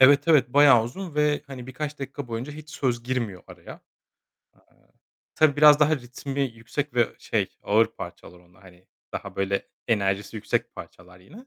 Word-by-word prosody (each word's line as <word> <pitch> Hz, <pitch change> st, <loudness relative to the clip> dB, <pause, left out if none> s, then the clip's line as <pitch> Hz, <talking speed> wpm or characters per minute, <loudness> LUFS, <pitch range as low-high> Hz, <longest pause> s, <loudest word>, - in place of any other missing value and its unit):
Evet, 140 Hz, +5 st, +6 dB
evet, 140 Hz, -6 st, +5 dB
bayağı 140 Hz, -6 st, +7 dB
uzun 165 Hz, +6 st, -7 dB
ve, 150 Hz, -1 st, +1 dB
hani, 130 Hz, -3 st, -9 dB
birkaç 150 Hz, +3 st, -5 dB
dakika 135 Hz, -1 st, -6 dB
boyunca 115 Hz, +5 st, -5 dB
hiç 155 Hz, 0 st, -11 dB
söz 125 Hz, -8 st, -1 dB
girmiyor 120 Hz, -7 st, -3 dB
araya. -, -, -12 dB
Eee, -, -, -15 dB, 1.5 s
tabii 150 Hz, -2 st, +3 dB
biraz 150 Hz, 0 st, +7 dB
daha 155 Hz, +1 st, +4 dB
ritmi 135 Hz, +2 st, -6 dB
yüksek 125 Hz, +3 st, -4 dB
ve 120 Hz, -2 st, +3 dB
şey, -, -, -1 dB
ağır 110 Hz, +2 st, +3 dB
parçalar 90 Hz, -, -10 dB
onlar, 90 Hz, +2 st, -24 dB
hani, 90 Hz, -1 st, -18 dB, 0.3 s
daha -, -, -6 dB
böyle, 95 Hz, 0 st, -1 dB, 0.2 s
enerjisi 100 Hz, -1 st, 0 dB
yüksek 105 Hz, -, -2 dB
parçalar 90 Hz, 0 st, -12 dB
yine. 225 Hz, -, -15 dB
130 Hz, 160 wpm, -25 LUFS, 110-145 Hz, 1.5 s, bayağı